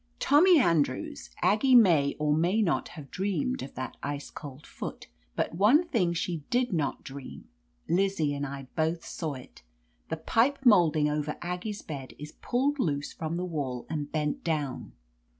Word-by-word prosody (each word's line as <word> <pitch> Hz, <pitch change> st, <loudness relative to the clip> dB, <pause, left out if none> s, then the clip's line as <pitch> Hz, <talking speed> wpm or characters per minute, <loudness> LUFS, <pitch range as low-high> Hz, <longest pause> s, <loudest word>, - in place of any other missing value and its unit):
Tommy 335 Hz, +4 st, +6 dB
Andrews, 155 Hz, -, 0 dB
Aggie 215 Hz, +8 st, +4 dB
may 165 Hz, -11 st, +5 dB
or 150 Hz, -1 st, +1 dB
may 175 Hz, +7 st, +2 dB
not 170 Hz, -, 0 dB
have 140 Hz, -3 st, -10 dB
dreamed 250 Hz, +7 st, -1 dB
of -, -, -8 dB
that 130 Hz, -1 st, -5 dB
ice 145 Hz, 0 st, -5 dB
cold 145 Hz, 0 st, -9 dB
foot, -, -, -7 dB, 0.3 s
but -, -, -1 dB
one 235 Hz, -, +4 dB
thing 180 Hz, -8 st, +2 dB
she 170 Hz, 0 st, -2 dB
did 245 Hz, -3 st, +1 dB
not 150 Hz, -5 st, -1 dB
dream; 135 Hz, 0 st, -9 dB, 0.4 s
Lizzie 175 Hz, -5 st, +1 dB
and 140 Hz, 0 st, -3 dB
I 140 Hz, -1 st, -5 dB
both 160 Hz, +1 st, 0 dB
saw 155 Hz, -4 st, -4 dB
it. 125 Hz, -, -13 dB, 0.5 s
The -, -, -2 dB
pipe 260 Hz, +5 st, +2 dB
molding 165 Hz, -9 st, +5 dB
over 150 Hz, 0 st, -2 dB
Aggie's 180 Hz, +4 st, -4 dB
bed 135 Hz, -4 st, -7 dB
is 150 Hz, +1 st, -8 dB
pulled 275 Hz, +4 st, 0 dB
loose 145 Hz, -, -1 dB
from 160 Hz, +1 st, -4 dB
the 180 Hz, -, -2 dB
wall 140 Hz, -8 st, -3 dB
and 150 Hz, -2 st, -3 dB
bent 155 Hz, -, -2 dB
down." 150 Hz, -5 st, -2 dB
165 Hz, 165 wpm, -28 LUFS, 145-205 Hz, 0.5 s, Tommy